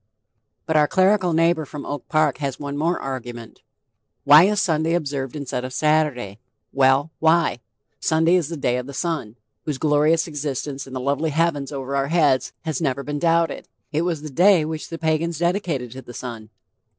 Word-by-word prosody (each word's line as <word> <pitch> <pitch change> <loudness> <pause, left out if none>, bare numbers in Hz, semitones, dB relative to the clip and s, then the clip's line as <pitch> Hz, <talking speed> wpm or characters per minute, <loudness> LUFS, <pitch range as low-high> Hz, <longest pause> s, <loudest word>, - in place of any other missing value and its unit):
But 160 - -1
our 150 -1 +4
clerical 185 0 +3
neighbor 165 0 +2
from 145 -1 -8
Oak 145 - -6
Park 155 -2 +2
has 140 -3 -3
one 140 -1 -5
more 165 +4 0
argument: 120 -3 -7 0.6
"Why 150 +4 +8
is 205 +1 +1
Sunday 165 -3 +1
observed 140 -5 -3
instead 140 -4 -4
of 130 0 -6
Saturday?" 150 -10 0 0.3
Well, 135 +3 +3
why? 160 -5 +3 0.4
Sun 160 +1 +1
day 170 - +4
is 170 -5 +1
the 165 - -5
day 125 -3 0
of 125 0 -5
the 140 - -8
Sun, 150 -10 -3 0.3
whose 150 -3 -2
glorious 155 +3 +2
existence 145 -2 -4
in 130 - -11
the 130 - -3
lovely 140 +4 0
heavens 150 -2 0
over 135 -1 -4
our 135 0 0
heads 145 -5 +2
has 160 -3 -3
never 140 -3 -1
been 145 0 -4
doubted; 165 -1 +1 0.2
it 155 +1 0
was 170 -3 -2
the 155 - -7
day 180 +2 +4
which 155 0 -5
the 165 - -5
Pagans 160 0 -1
dedicated 170 - -1
to 130 +2 -8
the 120 -2 -12
Sun. 115 -4 -7
150 Hz, 185 wpm, -22 LUFS, 135-165 Hz, 0.6 s, Why